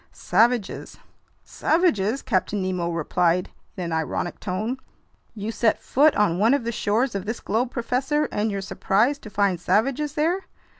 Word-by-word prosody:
"Savages." 225 +2 0 0.5
"Savages!" 275 - +1
Captain 195 +2 0
Nemo 185 -2 -1
replied 170 +2 0 0.3
in 185 - -3
an 170 - -4
ironic 160 +2 -2
tone. 215 +7 -3 0.6
"You 210 +1 -4
set 230 -1 +2
foot 295 +3 +3
on 180 -4 +2
one 225 +6 +4
of 280 - -2
the 235 - -2
shores 225 +3 0
of 195 -1 -3
this 225 +2 -3
globe, 235 +5 -1
professor, 265 +5 0
and 210 +1 0
you're 200 -1 -3
surprised 220 +8 +1
to 215 - -9
find 200 -3 +1
savages 275 - +1
there? 340 +6 0
215 Hz, 155 wpm, -24 LUFS, 190-255 Hz, 0.6 s, one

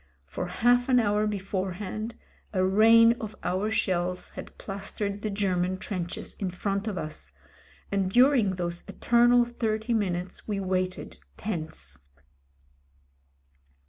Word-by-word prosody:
For 180 - -4
half 245 +7 +2
an 250 -1 +5
hour 210 -1 +2
beforehand 200 +2 -3 0.4
a 185 -1 +2
rain 225 +4 +6
of 215 -1 -6
our 185 +4 0
shells 180 -4 -1
had - - -10
plastered 200 +1 -4
the 215 - -2
Ger 200 -2 0
man 180 +1 0
trenches 185 -3 -4
in 195 - -1
front 195 +3 -2
of 205 -3 -2
us, 155 - -6 0.6
and 195 -2 +1
during 245 -3 +4
those 175 -1 -3
eternal 240 0 +4
thirty 225 -1 -2
minutes 180 -4 -2
we 205 -2 -1
waited 185 -1 -2 0.2
tense. 160 -7 -5
200 Hz, 125 wpm, -27 LUFS, 185-220 Hz, 0.6 s, rain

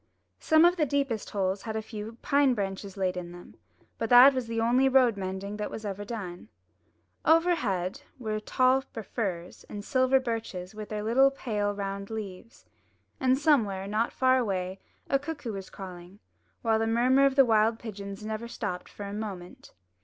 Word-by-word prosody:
Some 315 +1 +5
of 350 +1 +4
the 310 - +2
deepest 275 -5 -1
holes 190 -1 -1
had 220 +1 -5
a 220 - -1
few 220 +1 -8
pine 280 -2 +3
branches 195 -1 -4
laid 185 -1 0
in 175 -1 -6
them, 175 0 -12 0.5
but 225 - -2
that 250 +3 +9
was 255 -3 -3
the 230 0 -2
only 245 +4 +3
road 255 -4 +4
mending 195 +1 -5
that 210 - -2
ever 205 -3 -5
was 205 - -7
done. 185 - -6 0.8
Over 330 +2 +4
head 195 - -2 0.2
were 220 -4 -4
the 215 - -2
tall 255 +4 +3
firs 200 -8 -5
and 205 0 -7
silver 260 -1 +3
birches 225 -7 -4
with 215 -1 -8
their 210 -1 -3
little, 255 +5 +5
pale, 210 -6 -2
round 200 0 -4
leaves; 215 0 -8 0.5
and 260 0 +3
somewhere, 225 -11 +2
not 215 +3 0
far 260 0 +3
away, 190 -4 -2 0.3
a 275 - +2
cuckoo 285 -6 -5
was 195 -1 -7
calling, 180 0 -10 0.5
while 225 -1 +2
the 225 - 0
murmur 255 +4 +4
of 270 - -1
the 270 -1 +7
wild 225 0 +3
pigeons 200 -2 -8
never 220 +2 -4
stopped 205 -6 -5
for 205 - -8
a 200 - -6
moment. 200 -4 -7
220 Hz, 180 wpm, -28 LUFS, 195-255 Hz, 0.8 s, that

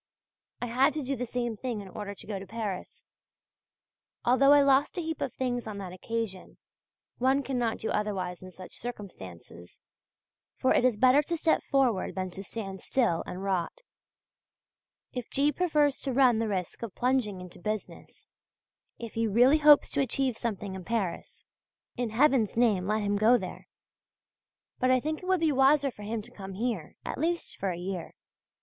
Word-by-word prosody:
I - - +1
had 260 +5 +3
to 305 - -3
do 275 +2 -2
the 250 0 -4
same 240 -1 -2
thing 235 0 -4
in 200 - -8
order 200 +1 -6
to - - -11
go 205 -2 -4
to 195 - -10
Paris; 210 -3 -5 1.2
although 265 +3 +5
I 290 -1 +7
lost 275 +3 +3
a - - 0
heap 320 -1 -4
of - - -1
things 245 -2 -2
on 210 -2 -5
that 190 -3 -6
occasion, 210 0 -5 0.6
one 265 +3 +3
cannot 245 -4 -1
do 220 - -3
otherwise 190 -4 -2
in 185 0 -10
such 185 0 -12
circumstances. 95 - -9 0.8
For 260 - +3
it - - +3
is 250 -4 +3
better 255 +4 +6
to 335 +3 -3
step 320 0 +2
forward 260 -8 +1
than 185 -1 -3
to 195 +3 -8
stand 195 -3 -6
still 235 -11 +1
and 185 +2 -6
rot. 190 - -1 1.4
If 250 -2 -5
G. 285 +2 +2
prefers 300 -5 +1
to 270 - -3
run 250 -3 +5
the 225 - 0
risk 185 -4 -3
of 230 -5 -6
plunging 245 -6 0
into 180 -1 -11
business; 215 +2 -6 0.7
if 230 -2 -7
he 225 0 0
really 245 +8 +5
hopes 300 -1 +7
to 280 - +1
achieve 265 -1 0
something 210 -4 -4
in 190 -1 -7
Paris, 200 -5 -3 0.5
in 245 -2 -2
Heaven's 240 -2 +3
name 210 -6 +3
let 215 0 +1
him 205 0 +1
go 225 +4 +5
there! 190 -5 -7 1.1
But 255 - +2
I 255 0 +5
think 310 +4 -3
it 365 - -8
would 370 -2 +2
be 320 -2 +3
wiser 275 +1 +4
for 210 - -14
him 215 +1 -3
to - - -9
come 195 -1 -8
here, 210 -5 -3
at - - -4
least 340 +3 -1
for 195 - -1
a 175 - -3
year. 180 -1 -5
230 Hz, 180 wpm, -29 LUFS, 195-265 Hz, 1.4 s, I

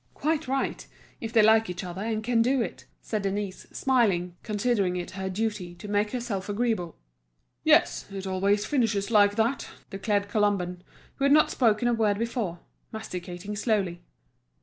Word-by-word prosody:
"Quite 315 -1 0
right, 270 +1 -2 0.3
if 225 - -5
they 225 -2 +5
like 220 -1 +5
each 180 +1 -4
other, 180 +1 -6
and 220 0 -2
can 235 0 +2
do 260 +3 +2
it," - - -7 0.2
said 215 -2 -2
Denise, 200 -1 -3
smiling, 195 -10 +1
considering 210 -4 0
it 175 - -5
her 190 0 -4
duty 190 -3 -3
to 175 +4 -9
make 205 +1 +1
herself 225 -6 -3
agreeable. 205 -6 -1 0.7
"Yes, - - +4
it 195 -1 -5
always 200 +2 +1
finishes 225 -6 0
like 205 -2 +5
that," 230 +5 0 0.2
declared 200 +1 0
Colomban, 200 -4 0 0.4
who 275 - +1
had 280 - +4
not 305 +1 +5
spoken 230 -1 +2
a 240 - +3
word 215 -3 +2
before, 225 -6 -2 0.3
masticating 185 -2 -6
slowly. 200 -6 0
210 Hz, 160 wpm, -27 LUFS, 190-230 Hz, 0.7 s, they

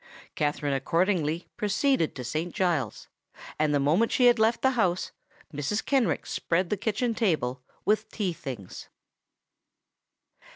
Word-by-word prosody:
Katherine 145 -1 -1
accordingly 165 +3 0
proceeded 210 - +1
to 130 - -5
Saint 155 +8 -3
Giles's; 165 - -1 0.5
and 155 -1 +2
the 145 - +2
moment 160 +12 +2
she 250 - +3
had 240 -1 +6
left 225 +1 +2
the 265 - +5
house 185 -8 0 0.4
Mrs. 145 +9 -2
Kenrick 260 - +1
spread 175 +1 -1
the - - +3
kitchen 220 +4 -1
table 155 - 0 0.2
with 215 +1 +1
the - - -17
tea 195 -5 0
things. 130 - -8
175 Hz, 135 wpm, -27 LUFS, 145-220 Hz, 0.5 s, had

